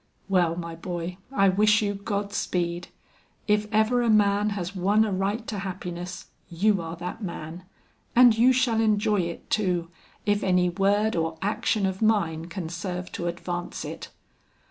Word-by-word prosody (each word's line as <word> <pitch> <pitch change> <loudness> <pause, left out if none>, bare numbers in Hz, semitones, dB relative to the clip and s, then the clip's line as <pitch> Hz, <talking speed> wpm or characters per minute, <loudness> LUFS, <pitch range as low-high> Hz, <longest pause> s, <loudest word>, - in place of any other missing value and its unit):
"Well, 175 -4 +2
my 170 -1 -5
boy, 175 +1 -5
I 195 -7 +4
wish 210 +3 +4
you 205 -1 0
God 200 0 -3
speed. 175 0 -2 0.6
If 210 0 +2
ever 220 +3 +3
a 235 - +1
man 205 -1 +3
has 180 +1 -4
won 200 +4 +3
a 210 - -2
right 200 +4 -1
to 210 -3 -4
happiness, 180 -2 -6 0.2
you 190 +3 +2
are 165 0 -6
that 175 +6 -6
man; 170 -2 -6 0.5
and 245 -2 +7
you 240 +3 +5
shall 245 -3 +2
enjoy 210 -1 +2
it 170 -1 -5
too, 180 -5 0 0.3
if 205 0 +2
any 180 -1 +3
word 200 +4 +1
or 160 -1 -1
action 205 0 0
of 190 +1 -2
mine 170 -8 +1
can 170 0 -5
serve 180 +1 -5
to 175 - -4
advance 175 0 -4
it." - - -7
195 Hz, 165 wpm, -26 LUFS, 175-210 Hz, 0.6 s, and